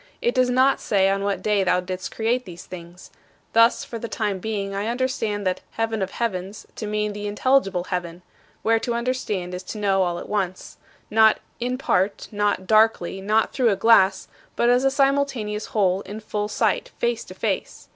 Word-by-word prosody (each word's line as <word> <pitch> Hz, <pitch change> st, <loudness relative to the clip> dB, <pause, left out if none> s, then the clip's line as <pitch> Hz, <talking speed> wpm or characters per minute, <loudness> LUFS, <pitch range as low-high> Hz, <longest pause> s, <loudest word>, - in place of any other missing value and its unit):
It 240 Hz, -, +1 dB
does 255 Hz, -1 st, +3 dB
not 260 Hz, +2 st, +3 dB
say 195 Hz, -2 st, +2 dB
on 195 Hz, 0 st, -1 dB
what 200 Hz, 0 st, -1 dB
day 210 Hz, -2 st, +2 dB
thou 180 Hz, -1 st, +2 dB
didst 185 Hz, 0 st, -5 dB
create 235 Hz, +3 st, 0 dB
these 175 Hz, -3 st, -10 dB
things. 175 Hz, 0 st, -11 dB, 0.4 s
Thus, 230 Hz, +1 st, +4 dB
for 230 Hz, -, -6 dB
the 230 Hz, -, -5 dB
time 210 Hz, -4 st, -2 dB
being 200 Hz, -1 st, -3 dB
I 200 Hz, +2 st, -2 dB
understand 230 Hz, -4 st, -1 dB
that 185 Hz, -1 st, 0 dB
"heaven 225 Hz, -1 st, -1 dB
of 190 Hz, -, -1 dB
heavens" 195 Hz, -3 st, -4 dB
to 215 Hz, -, -4 dB
mean 210 Hz, 0 st, -1 dB
the 205 Hz, 0 st, -5 dB
intelligible 205 Hz, -4 st, +2 dB
heaven, 180 Hz, -1 st, -4 dB, 0.4 s
where 225 Hz, 0 st, +3 dB
to 235 Hz, 0 st, -2 dB
understand 235 Hz, -7 st, -2 dB
is 180 Hz, -, -4 dB
to 185 Hz, +4 st, -7 dB
know 195 Hz, -2 st, +2 dB
all 175 Hz, -2 st, 0 dB
at -, -, -7 dB
once 190 Hz, -3 st, -3 dB, 0.3 s
not 220 Hz, 0 st, +5 dB, 0.2 s
"in 250 Hz, +1 st, -1 dB
part," 200 Hz, -6 st, 0 dB
not 205 Hz, -2 st, 0 dB
"darkly," 215 Hz, -3 st, +3 dB
not 215 Hz, +3 st, +1 dB
"through 250 Hz, -4 st, +3 dB
a 200 Hz, -, +2 dB
glass" 195 Hz, -2 st, +4 dB, 0.3 s
but 240 Hz, +1 st, +3 dB
as 250 Hz, +1 st, +3 dB
a 270 Hz, -, +4 dB
simultaneous 270 Hz, -6 st, 0 dB
whole, 190 Hz, -3 st, +1 dB
in 205 Hz, +3 st, -8 dB
full 210 Hz, -1 st, -3 dB
sight, 355 Hz, -, 0 dB
"face 480 Hz, 0 st, -1 dB
to -, -, -11 dB
face." -, -, -3 dB
210 Hz, 190 wpm, -23 LUFS, 190-235 Hz, 0.4 s, not